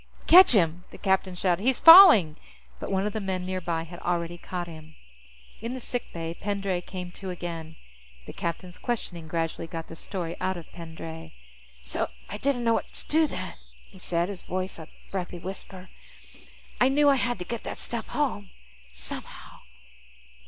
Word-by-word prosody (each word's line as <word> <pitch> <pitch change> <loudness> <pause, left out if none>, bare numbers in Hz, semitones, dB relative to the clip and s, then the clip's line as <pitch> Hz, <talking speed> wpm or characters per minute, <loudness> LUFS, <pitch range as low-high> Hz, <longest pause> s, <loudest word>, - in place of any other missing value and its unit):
"Catch 365 -3 +9
him!" 175 -3 +2
the - - -12
captain 190 -2 0
shouted. 180 0 +1
"He's 260 +3 +3
falling!" 325 - +10 0.4
But - - -5
one 195 0 +1
of 210 - -2
the 220 - -2
men 185 -2 -3
nearby 175 -3 -2
had 175 +1 -10
already 175 0 -2
caught 180 0 -5
him. 155 -1 -12 0.7
In 235 +3 -4
the - - -5
sick 245 0 -4
bay, 165 -1 -5
Pendray 195 -1 -2
came 180 -1 -7
to 190 +1 -8
again. 165 -3 -6 0.5
The - - -9
captain's 175 +1 -5
questioning 180 -9 -4
gradually 165 0 -2
got 165 0 -7
the 165 - -8
story 170 -1 -5
out 190 -1 -1
of 170 - -8
Pendray. 160 -1 -9 0.3
"... 65 - -25 0.2
So 60 - -2 0.2
I - - -6
didn't 270 -3 0
know 230 -1 +3
what - - -2
to - - -6
do 315 +1 +3
then," - - -5 0.4
he 190 - -15
said, 170 -1 0
his 195 -3 -7
voice 185 -1 -4
a 160 - -9 0.2
breathy 180 -2 -4
whisper. 185 +1 -8 0.9
"I 255 - +5
knew 290 +2 +4
I 280 -1 +5
had 245 -1 0
to 180 - -6
get 235 +4 -4
that - - -5
stuff 230 -2 -4
home. 230 -10 -2 0.4
Somehow." 60 0 -7
180 Hz, 180 wpm, -27 LUFS, 170-210 Hz, 0.9 s, falling